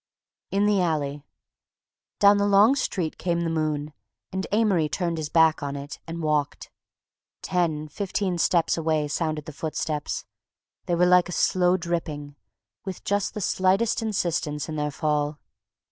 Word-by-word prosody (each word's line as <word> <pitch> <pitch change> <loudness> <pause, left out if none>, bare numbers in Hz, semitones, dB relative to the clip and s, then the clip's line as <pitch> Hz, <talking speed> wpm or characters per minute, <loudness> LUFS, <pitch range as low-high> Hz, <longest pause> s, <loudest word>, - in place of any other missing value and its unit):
IN 200 +1 +1
THE 205 -2 +3
ALLEY 150 -4 -1 1.0
Down 200 0 +6
the 200 0 +2
long 205 +5 +6
street 175 - -2
came 170 -1 0
the 165 -1 -1
moon, 155 -2 -2 0.4
and 190 0 -3
Amory 200 -8 +2
turned 170 +2 -2
his 150 -2 -4
back 160 0 +4
on 140 -1 -3
it 140 +1 -7
and 165 0 -5
walked. 150 -2 -1 0.7
Ten, 160 -4 0
fifteen 185 +2 -2
steps 170 -1 +2
away 155 -2 0
sounded 155 0 -2
the 155 - -8
footsteps. 155 0 -3 0.6
They 175 - +1
were 175 +1 +4
like 180 0 +5
a - - -4
slow 180 +1 +2
dripping, 160 -5 -4 0.5
with 190 -2 -6
just 205 -1 -1
the 210 - -3
slightest 195 +6 +2
insistence 170 -8 -1
in 155 - -5
their 150 -1 -1
fall. 150 0 -1
165 Hz, 150 wpm, -25 LUFS, 150-185 Hz, 1.0 s, Down